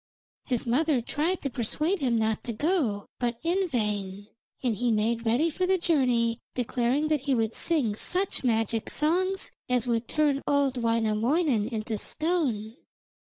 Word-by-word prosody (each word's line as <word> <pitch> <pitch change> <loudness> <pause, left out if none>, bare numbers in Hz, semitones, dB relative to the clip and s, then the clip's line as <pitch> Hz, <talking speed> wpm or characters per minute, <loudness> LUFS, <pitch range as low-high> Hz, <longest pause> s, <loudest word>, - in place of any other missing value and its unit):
His 250 -4 -1
mother 280 +3 +2
tried 310 +9 -1
to 275 - -1
persuade 300 - -1
him 250 -5 +1
not 220 -1 0
to 235 - -3
go, 255 - 0
but 240 -1 -1
in 365 +3 +1
vain, 205 -5 -2 0.3
and 240 -4 +1
he 240 +3 0
made 225 +2 0
ready 280 +9 +2
for 365 +4 -1
the 380 0 +3
journey, 250 -9 +1 0.2
declaring 250 +4 0
that 305 -3 +1
he 265 - +4
would 225 -1 0
sing 290 -11 +1
such 365 - -1
magic 225 -2 0
songs 370 +5 0 0.2
as 250 -1 +2
would 230 -1 0
turn 295 -3 +1
old 285 -2 +2
Wainamoinen 230 +2 +1
into 220 -2 -3
stone. 270 - -1
245 Hz, 155 wpm, -27 LUFS, 225-305 Hz, 0.3 s, he